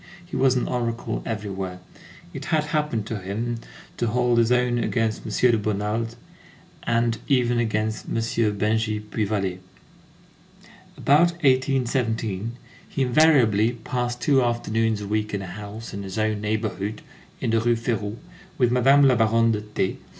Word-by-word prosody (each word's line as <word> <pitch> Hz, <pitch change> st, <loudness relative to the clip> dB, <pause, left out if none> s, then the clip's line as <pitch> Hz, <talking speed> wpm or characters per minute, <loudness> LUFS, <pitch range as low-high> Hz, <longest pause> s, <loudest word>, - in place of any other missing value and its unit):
He 175 Hz, -, -8 dB
was 130 Hz, -1 st, +3 dB
an 125 Hz, -, 0 dB
oracle 120 Hz, -1 st, -2 dB
everywhere. 95 Hz, -4 st, -4 dB, 0.5 s
It -, -, -6 dB
had 155 Hz, -2 st, +1 dB
happened 150 Hz, -9 st, 0 dB
to 110 Hz, -1 st, -4 dB
him 115 Hz, +5 st, -3 dB, 0.4 s
to 120 Hz, -, 0 dB
hold 120 Hz, +1 st, +2 dB
his 115 Hz, +1 st, +3 dB
own 125 Hz, -1 st, +2 dB
against 115 Hz, -2 st, 0 dB
M. 120 Hz, +3 st, +3 dB
de -, -, +3 dB
Bonald, 105 Hz, +2 st, -2 dB, 0.7 s
and 115 Hz, -1 st, +1 dB
even 120 Hz, -3 st, +2 dB
against 110 Hz, -1 st, -1 dB
M. -, -, -3 dB
Bengy 110 Hz, -1 st, 0 dB
Puy 105 Hz, 0 st, -3 dB
Vallée. 95 Hz, -3 st, -1 dB, 1.4 s
About 170 Hz, +5 st, +4 dB
1817, 120 Hz, -5 st, +1 dB, 0.4 s
he 135 Hz, -, -1 dB
invariably 125 Hz, -6 st, +4 dB
passed 120 Hz, +1 st, -3 dB
two 140 Hz, -3 st, +3 dB
afternoons 115 Hz, -2 st, 0 dB
a 100 Hz, -, -5 dB
week 105 Hz, 0 st, -1 dB
in 100 Hz, -, -3 dB
a -, -, -6 dB
house 105 Hz, +4 st, -8 dB
in 100 Hz, -, -5 dB
his 95 Hz, +1 st, -6 dB
own 110 Hz, -1 st, 0 dB
neighborhood, 105 Hz, -1 st, -2 dB, 0.4 s
in 115 Hz, -, -1 dB
the 115 Hz, 0 st, +2 dB
Rue 120 Hz, +1 st, +2 dB
Férou, 110 Hz, -3 st, -2 dB, 0.4 s
with 125 Hz, -3 st, +3 dB
Madame 135 Hz, +3 st, +5 dB
la 130 Hz, -, +5 dB
Baronne 115 Hz, 0 st, +3 dB
de 105 Hz, -1 st, -1 dB
T. 105 Hz, -3 st, -2 dB
115 Hz, 150 wpm, -24 LUFS, 105-120 Hz, 1.4 s, Madame